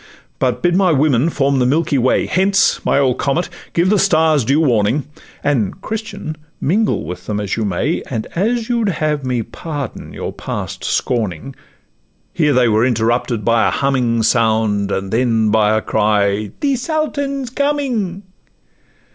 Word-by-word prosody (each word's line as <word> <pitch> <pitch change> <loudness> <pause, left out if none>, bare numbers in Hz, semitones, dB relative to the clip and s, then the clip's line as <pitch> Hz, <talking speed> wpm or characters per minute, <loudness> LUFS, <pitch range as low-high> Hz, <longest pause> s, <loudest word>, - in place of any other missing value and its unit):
But 130 +3 0
bid 175 0 +3
my 185 -2 +3
women 145 -1 +2
form 140 -3 +1
the 125 - +2
milky 150 0 +1
way. 125 +1 +2
Hence, 195 +1 +2
my - - +2
old 135 -3 +2
comet! 150 +6 0 0.2
give 175 +3 +2
the 210 - +3
stars 160 -7 +3
due 135 +7 +2
warning— 125 -1 +2 0.4
And, 125 -9 0
Christian! 215 -8 -5 0.2
mingle 210 +8 +1
with 90 +2 -7
them 105 -1 -2
as 105 -1 -2
you 110 - -1
may, 95 -4 -1
And 110 - -3
as 225 +5 0
you'd 235 -4 +1
have 155 -4 -1
me 125 -3 -1
pardon 145 0 -6
your - - -5
past - - -6
scorning 115 - -2 0.4
' - - -43
Here 150 -3 +2
they 125 -3 +3
were 110 0 +3
interrupted 120 -1 0
by 115 -1 +3
a - - +3
humming 125 -4 +1
Sound, 110 -3 +2
and 95 0 -3
then 115 -2 +2
by 110 0 +3
a 110 - -2
cry, 105 -1 +1
'The 275 -2 +1
Sultan 285 -1 -2
's 240 - -9
coming! 255 -10 -1
135 Hz, 165 wpm, -17 LUFS, 110-180 Hz, 0.4 s, bid